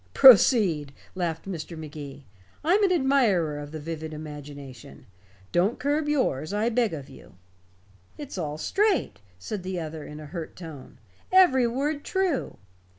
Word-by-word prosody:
"Proceed," 195 Hz, -, +6 dB, 0.2 s
laughed 170 Hz, -3 st, -3 dB
Mr. 170 Hz, -2 st, -6 dB
Magee. 145 Hz, -3 st, -9 dB, 0.4 s
"I'm 375 Hz, +7 st, +3 dB
an 390 Hz, -, +4 dB
admirer 240 Hz, -, +2 dB
of 145 Hz, 0 st, -8 dB
the 155 Hz, -, -6 dB
vivid 160 Hz, 0 st, -6 dB
imagination. 145 Hz, -4 st, -10 dB, 0.5 s
Don't 190 Hz, +7 st, +2 dB
curb 290 Hz, +3 st, 0 dB
yours, 190 Hz, -, 0 dB
I 210 Hz, +3 st, +1 dB
beg 235 Hz, -2 st, +1 dB
of 145 Hz, -4 st, -6 dB
you." 135 Hz, -8 st, -15 dB, 0.8 s
"It's 290 Hz, -3 st, -7 dB
all 150 Hz, -5 st, -3 dB
straight," 400 Hz, -, 0 dB, 0.2 s
said 185 Hz, -, -5 dB
the 185 Hz, 0 st, -4 dB
other 160 Hz, -1 st, -6 dB
in 150 Hz, +1 st, -9 dB
a 155 Hz, -, -9 dB
hurt 165 Hz, +1 st, -7 dB
tone. 160 Hz, -6 st, -10 dB, 0.3 s
"Every 310 Hz, -10 st, +6 dB
word 285 Hz, +5 st, -2 dB
true. 375 Hz, -7 st, -1 dB
175 Hz, 145 wpm, -26 LUFS, -, 0.8 s, Proceed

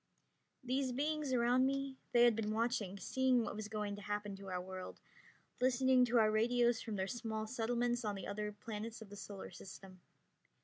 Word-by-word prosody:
These 255 Hz, 0 st, 0 dB
beings 300 Hz, +1 st, -1 dB
around 245 Hz, +1 st, +4 dB
me, 275 Hz, 0 st, -2 dB, 0.2 s
they 240 Hz, -1 st, +6 dB
had 240 Hz, -2 st, +6 dB
been 215 Hz, -1 st, -1 dB
watching, 220 Hz, -4 st, 0 dB
seeing 255 Hz, +3 st, +2 dB
what 210 Hz, -, -4 dB
was 215 Hz, 0 st, -4 dB
going 210 Hz, -1 st, -3 dB
to -, -, -8 dB
happen 205 Hz, 0 st, -3 dB
to 195 Hz, 0 st, -10 dB
our 180 Hz, -1 st, -2 dB
world, 185 Hz, 0 st, -7 dB, 0.6 s
listening 255 Hz, 0 st, +4 dB
to 240 Hz, 0 st, +2 dB
our 215 Hz, -2 st, +5 dB
radios 235 Hz, +1 st, +3 dB
from 220 Hz, -3 st, -4 dB
their 190 Hz, -1 st, 0 dB
small 220 Hz, 0 st, -3 dB
settlements 240 Hz, +1 st, 0 dB
on 210 Hz, -2 st, -1 dB
the 195 Hz, -, -6 dB
other 210 Hz, +1 st, -3 dB
planets 220 Hz, +2 st, -6 dB
of 200 Hz, -, -16 dB
the -, -, -7 dB
Solar 200 Hz, -1 st, -8 dB
System. 185 Hz, 0 st, -11 dB
225 Hz, 185 wpm, -37 LUFS, 205-245 Hz, 0.6 s, they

